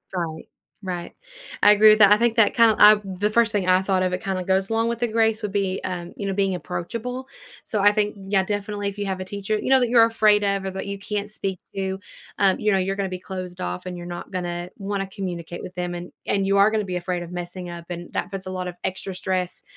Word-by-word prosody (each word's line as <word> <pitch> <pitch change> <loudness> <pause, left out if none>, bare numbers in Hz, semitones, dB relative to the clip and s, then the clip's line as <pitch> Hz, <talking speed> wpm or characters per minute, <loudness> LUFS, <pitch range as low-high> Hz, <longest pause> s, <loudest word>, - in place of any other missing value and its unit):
Right, 165 -3 -4 0.4
right. 175 -2 -5 0.5
I 205 - +8
agree 210 +1 +7
with 215 0 +6
that, 205 -1 +8
I 210 - +8
think 235 0 +2
that 225 -2 +5
kinda, 230 -2 +5
I 210 +1 +9
the 195 +1 -2
first 230 +1 +3
thing 200 -4 -1
I 185 0 +5
thought 190 -1 +1
of 185 -1 0
it 180 - -3
kinda 190 -2 -2
goes 190 +1 +1
along 225 0 +1
with 235 -1 -3
the 240 - +1
grace 225 0 +1
would 210 -2 -3
be, 195 -2 -1
um, 175 -2 -5
you 200 - -4
know, 195 - -1
being 195 -1 +1
approachable. 230 +9 -5 0.4
So, 210 - -1
I 205 +1 +6
think, 210 0 0
yeah, 195 0 0
definitely, 205 0 -3
if 200 - -10
you 205 - -2
have 190 -1 -2
a 185 - -4
teacher, 200 +2 -2
you - - -3
know, 265 0 +6
that 245 -2 +1
you're 230 -1 +7
afraid 215 -2 +3
of, 200 -1 0
or 190 - -2
that 190 +1 -5
you 200 0 -4
can't 205 0 -4
speak 195 -3 -4 0.2
to, 190 -1 -2 0.4
um, 195 -2 +3
you 210 - +2
know, 195 - +3
you're 190 +1 0
gonna 195 -1 -2
be 185 0 -5
closed 185 -1 -7
off 90 0 -4
and 180 -1 -5
you're 175 - -8
not 175 0 -7
gonna 175 -1 -4
wanna 195 -1 -3
communicate 175 -3 -6
with 185 - -9
them, 180 -1 -3
and 175 0 -7
and 195 -1 0
you 195 0 +3
are 200 +2 +5
gonna 215 -1 0
be 185 -2 -4
afraid 175 0 -3
of 170 - -10
messing 180 0 -6
up, 170 -1 -8
and 175 -1 -7
that 180 - -3
puts 195 -1 -5
a 185 - -5
lot 185 -1 -4
of 180 - -6
extra 190 +1 -3
stress, 185 -1 -2
195 Hz, 265 wpm, -23 LUFS, 180-210 Hz, 0.5 s, I